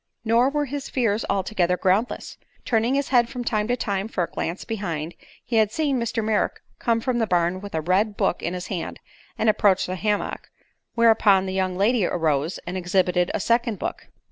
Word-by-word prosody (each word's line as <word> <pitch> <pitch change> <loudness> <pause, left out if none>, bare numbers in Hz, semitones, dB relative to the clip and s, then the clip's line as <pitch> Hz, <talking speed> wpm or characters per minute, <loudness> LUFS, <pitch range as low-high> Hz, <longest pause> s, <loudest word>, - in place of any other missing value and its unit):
Nor 235 +4 +4
were 295 +1 -1
his 280 +1 -5
fears 225 -4 0
altogether 185 -2 +1
groundless. 195 +7 0 0.3
Turning 230 +2 +1
his 280 0 -1
head 240 -2 +4
from 245 0 -5
time 215 -2 0
to 245 +1 0
time 200 -2 -2
for 190 -5 -1
a 170 - -5
glance 170 +3 -4
behind, 170 -7 -4 0.3
he 235 - 0
had 215 -1 +3
seen 285 -1 0
Mr. 230 -1 -1
Merrick 215 -1 0 0.2
come 230 -2 +1
from 245 0 0
the 225 - +1
barn 175 0 +1
with 200 -4 -7
a 160 - 0
red 195 +6 +1
book - - 0
in 175 - -2
his 180 0 -5
hand 185 -4 -5 0.4
and 225 - 0
approach 205 -3 +3
the 185 - -4
hammock, 210 +2 -2 0.5
whereupon 220 -5 +5
the 190 - -3
young 185 -1 -1
lady 215 +3 +2
arose 160 -2 0
and 180 +2 -4
exhibited 180 -1 +1
a - - 0
second 235 +1 +1
book. - - -5
205 Hz, 195 wpm, -24 LUFS, 180-230 Hz, 0.5 s, whereupon